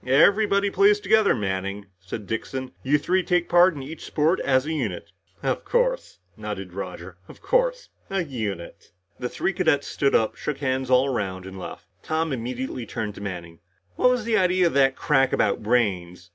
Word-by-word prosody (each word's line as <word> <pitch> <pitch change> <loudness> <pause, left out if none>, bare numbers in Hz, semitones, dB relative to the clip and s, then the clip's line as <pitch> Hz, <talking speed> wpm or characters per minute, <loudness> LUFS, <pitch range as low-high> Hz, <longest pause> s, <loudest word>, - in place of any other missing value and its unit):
"Everybody 200 - +4
plays 200 +2 +4
together, 210 +1 +3
Manning," 100 0 -3
said 95 +3 -7
Dixon. 130 +4 -4
"You 145 +3 +2
three 180 +6 +1
take 175 -1 +1
part 175 0 +5
in 140 - -6
each 155 +4 -9
sport 160 +4 +1
as 130 0 +2
a 160 - -2
unit." 115 - -3 0.3
"Of - - -1
course," - - 0 0.2
nodded 100 -4 -6
Roger. 90 -1 -7
"Of - - -15
course - - +1 0.2
as 195 -3 -1
a - - -14
unit." 105 -10 -6 0.3
The 125 - -3
three 195 - -1
cadets 160 -6 +1
stood 140 -1 +1
up, 110 - +2
shook 150 -2 -4
hands 130 -2 -1
all 130 +1 +5
around 95 -7 -3
and 95 0 -8
left. - - -8 0.2
Tom 160 -1 -1
immediately 125 0 -4
turned 105 0 -4
to - - -11
Manning. 85 -4 -7 0.4
"What - - +4
was 250 -3 0
the 230 -1 +2
idea 185 0 +3
of 170 - +1
that 135 -1 +4
crack 135 -3 +2
about 100 - +1
brains?" 95 -6 0
130 Hz, 185 wpm, -24 LUFS, -, 0.4 s, part